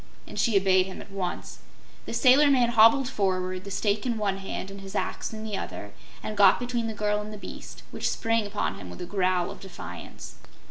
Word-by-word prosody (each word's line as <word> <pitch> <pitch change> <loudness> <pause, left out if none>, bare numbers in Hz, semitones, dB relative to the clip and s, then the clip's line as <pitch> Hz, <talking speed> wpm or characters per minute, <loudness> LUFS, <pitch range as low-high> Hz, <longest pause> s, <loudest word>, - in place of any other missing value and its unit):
and - - -7
she 225 -4 +3
obeyed 190 -1 +4
him 190 - -8
at - - -11
once. 190 -2 -4 0.5
The - - -4
sailor 285 +2 +6
man 250 -4 +4
hobbled 235 +4 +6
forward, 185 -5 -1
the - - -6
stake 205 +1 0
in 240 -3 -1
one 200 -2 0
hand 195 0 -5
and 195 0 -9
his 195 +1 -9
axe - - -2
in 220 -1 -7
the 215 -2 -3
other, 105 - -6 0.3
and 215 - -4
got 200 -2 +6
between 240 -2 -2
the 220 - -4
girl 210 0 0
and 210 +1 -7
the 210 - -7
beast, - - -9
which - - -1
sprang 225 -2 0
upon 205 +1 -2
him 90 - -9
with 90 - -9
a - - -3
growl 185 -2 0
of - - -10
defiance. 95 - -9
205 Hz, 220 wpm, -27 LUFS, 190-225 Hz, 0.5 s, sailor